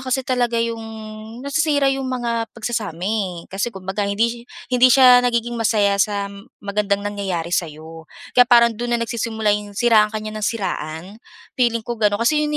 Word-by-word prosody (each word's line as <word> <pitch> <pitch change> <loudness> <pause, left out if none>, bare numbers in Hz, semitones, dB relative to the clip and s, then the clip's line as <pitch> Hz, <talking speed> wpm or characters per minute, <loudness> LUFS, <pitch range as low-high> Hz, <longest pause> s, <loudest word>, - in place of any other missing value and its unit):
kasi 260 0 -2
talaga 245 -2 0
'yong 230 0 -1 0.6
nasisira 285 -1 +1
'yong 270 -1 -3
mga 235 -3 -2
pagsasama 215 -7 -4
eh. 190 -5 -2
Kasi 200 +5 -1
kumbaga 195 0 -4
hindi 200 +3 +1
si 240 - -10 0.3
hindi 250 +1 +6
siya 250 -1 +7
nagiging 240 -1 0
masaya 205 -3 +2
sa 200 -1 -1 0.3
magandang 200 0 -1
nangyayari 190 -5 -3
sa 170 -2 +1
'yo 160 +1 -12 0.2
kaya 245 -1 +5
parang 235 -1 +6
do'n 240 +2 -2
na - - -4
nagsisimula 220 -2 -1
'yong 205 -1 -4
siraan 225 -2 +4
ka 215 - -6
niya 215 0 -5
nang 215 0 -2
siraan. 170 -7 -4 0.5
Feeling 235 -3 0
ko 235 -2 -5
gano'n 210 +1 +2
kasi 300 +4 +3
'yon 300 0 -1
225 Hz, 175 wpm, -20 LUFS, 200-240 Hz, 0.6 s, siya